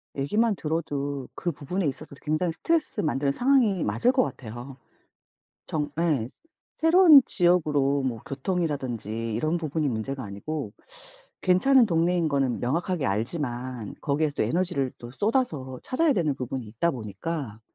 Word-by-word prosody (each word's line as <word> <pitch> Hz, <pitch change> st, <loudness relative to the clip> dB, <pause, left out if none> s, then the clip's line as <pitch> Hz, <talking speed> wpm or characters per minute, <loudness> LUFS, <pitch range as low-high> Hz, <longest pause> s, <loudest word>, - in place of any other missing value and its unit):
얘기만 210 Hz, +10 st, +1 dB
들어도 145 Hz, -4 st, -3 dB
그 175 Hz, -, -2 dB
부분에 170 Hz, +5 st, -3 dB
있어서도 140 Hz, +1 st, -6 dB
굉장히 155 Hz, +3 st, 0 dB
스트레스 330 Hz, -, 0 dB
만드는 140 Hz, -2 st, 0 dB
상황이 245 Hz, -, +2 dB
맞을 245 Hz, +1 st, +2 dB
것 260 Hz, -1 st, +3 dB
같아요. 120 Hz, +3 st, -7 dB, 0.9 s
정 150 Hz, -2 st, -2 dB
예. 145 Hz, -10 st, +1 dB, 0.5 s
새로운 325 Hz, -4 st, +7 dB
지역으로 150 Hz, -6 st, +2 dB
뭐 120 Hz, -4 st, -2 dB
교통이라든지 130 Hz, -, -2 dB
이런 155 Hz, +8 st, 0 dB
부분이 155 Hz, -2 st, -1 dB
문제가 125 Hz, +3 st, -3 dB
아니고 105 Hz, +4 st, -5 dB, 0.7 s
괜찮은 235 Hz, +7 st, +5 dB
동네인 170 Hz, -1 st, +1 dB
거는 135 Hz, -4 st, 0 dB
명확하게 160 Hz, +3 st, -1 dB
알지만 120 Hz, -, -1 dB
거기에서 145 Hz, 0 st, 0 dB
또 -, -, +3 dB
에너지를 170 Hz, -7 st, 0 dB
또 120 Hz, 0 st, -9 dB
쏟아서 155 Hz, -, -1 dB
찾아야 295 Hz, +3 st, +2 dB
되는 155 Hz, -, 0 dB
부분이 125 Hz, -2 st, -5 dB
있다 115 Hz, +11 st, 0 dB
보니까 120 Hz, -, -5 dB
150 Hz, 340 characters per minute, -26 LUFS, 130-180 Hz, 0.9 s, 새로운